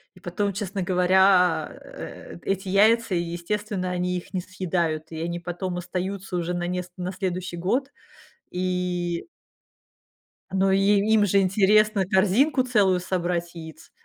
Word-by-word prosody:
и - - -16
потом, 195 +3 -2
честно 195 -1 -3
говоря, 180 -2 +3
э, 85 - -10
эти 195 0 -2
яйца, 215 +1 +4
и, - - +2
естественно, 185 +3 -3
они 180 0 -1
их 180 - -10
не 185 - -1
съедают, 170 -4 -2
и 160 - -6
они 170 +1 -3
потом 175 +1 -4
остаются 185 +1 -4
уже 175 +1 -2
на 175 0 -2
неск 180 0 -4
на 180 +1 -3
следующий 185 -2 -4
год 250 +11 -1 0.6
и 180 - -2 1.2
Ну, 190 0 +2
и 195 - +3 0.3
им 210 -2 +5
же 200 0 +3
интересно 200 +1 +3
корзинку 215 - +3
целую 205 -7 +3
собрать 175 -1 -2
яиц. 160 -2 -11
185 Hz, 140 wpm, -25 LUFS, 175-195 Hz, 1.2 s, им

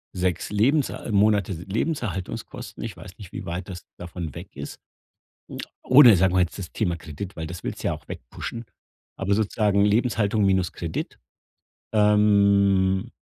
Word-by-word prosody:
6 90 0 -1
Lebenser 120 +3 +1
Monate 100 -1 +3
se 85 0 -7
Lebenserhaltungskosten- 105 - -4
ich 110 -6 -5
weiß 95 +1 -12
nicht, 100 -4 -11
wie - - -7
weit 90 +4 -5
das 90 -3 -8
davon 85 -4 -7
weg - - -10
ist- - - -8 1.0
oder 130 -4 +8
sagen 95 +1 +2
wir 95 - +4
jetzt 90 +1 -1
das 90 -4 -7
Thema 90 -6 -1
Kredit, 85 +4 -8
weil 80 - -4
das 85 +2 -8
willst - - -5
du - - -2
ja - - 0
auch - - -13
wegpushen, 115 0 -7 0.5
aber 95 +1 -1
sozusagen 105 -1 +2
Lebenshaltung 110 -1 +2
minus 95 -2 +2
Kredit, 85 -2 -5 0.8
ähm, 100 -1 +3
100 Hz, 155 wpm, -24 LUFS, 90-105 Hz, 1.0 s, oder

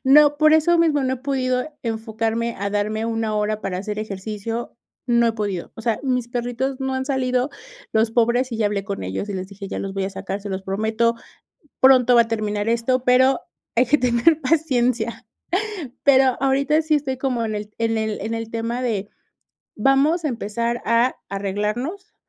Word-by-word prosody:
no, 290 +2 +6
por 310 +1 +5
eso 315 +2 +4
mismo 315 -3 +3
no 260 - +1
he - - -7
podido 255 -2 0 0.2
enfocarme 225 0 -2
a 200 +1 -2
darme 215 +2 -1
una 225 -1 -1
hora 210 0 -1
para 185 -3 -3
hacer 210 +2 -4
ejercicio, 215 +3 -5 0.3
no 235 -1 +3
he - - 0
podido. 205 -5 -4
O 225 - -8
sea, 225 -2 0
mis 250 -3 -1
perritos 245 +3 -2
no 265 0 -1
han 260 0 -1
salido, 255 -1 0 0.4
los 220 +1 +2
pobres, 240 +2 +2
y 230 - -2
ya 220 - +1
hablé 205 -1 -2
con 200 -1 -4
ellos, 95 - -4
y 205 - -3
les 185 0 -5
dije: 200 -1 -9
"Ya - - -4
los 195 0 -4
voy 195 -1 -1
a 195 - -3
sacar, 195 +1 -5
se 205 - -7
los 190 0 -4
prometo, 220 +4 0 0.7
pronto 255 -2 +6
va 235 - +8
a 230 - -1
terminar 215 -2 -2
esto, 235 +2 +1
pero 260 +1 +4 0.4
hay 245 +2 +4
que 295 +5 +3
tener 250 +5 +3
paciencia". 255 -6 0 0.8
Pero, 265 -2 +5
ahorita 275 +3 +2
sí 310 -1 +1
estoy 270 -3 -1
como 255 -4 -1
en 215 -1 -2
el 210 0 -5
en 225 -1 0
el 220 -1 -2
en 220 +3 -3
el 225 0 -5
tema 230 +2 -3
de 210 -5 -1 0.7
vamos 275 +8 +3
a - - +2
empezar 235 0 -2
a 235 +2 +2
arreglarnos, 210 - -3
235 Hz, 190 wpm, -22 LUFS, 215-260 Hz, 0.8 s, va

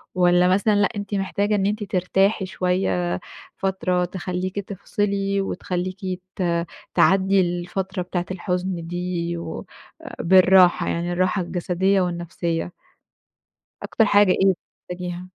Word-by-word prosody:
والّا 180 0 +4
مثلًا 200 +3 +3
لأ 205 0 +3
أنتِ 205 0 -5
محتاجة 200 +2 0
إن 195 -1 +1
أنتِ 210 +1 -1
ترتاحي 190 +2 +1
شوية 95 - -1 0.4
فترة 185 -2 0
تخلّيكِ 185 +1 -4
تفصلي، 200 0 -2
وتخلّيكِ 185 0 -3 0.4
ت 185 - -2 0.5
تعدي 190 0 +4
الفترة 180 +2 -3
بتاعة 180 0 -3
الحُزن 180 -2 -3
دي 175 -1 -3
و 170 - -6 0.4
أ - - -8
بالراحة 185 0 +5
يعني 175 +1 -2
الراحة 185 +2 +1
الجسدية 185 +2 0
والنفسية؟ 175 -1 -3 1.1
أكتر 225 - +2
حاجة 205 -2 +5
إيه 190 -1 +3 0.2
بتحتاجيها؟ 180 0 -6
185 Hz, 115 wpm, -23 LUFS, 175-195 Hz, 1.1 s, بالراحة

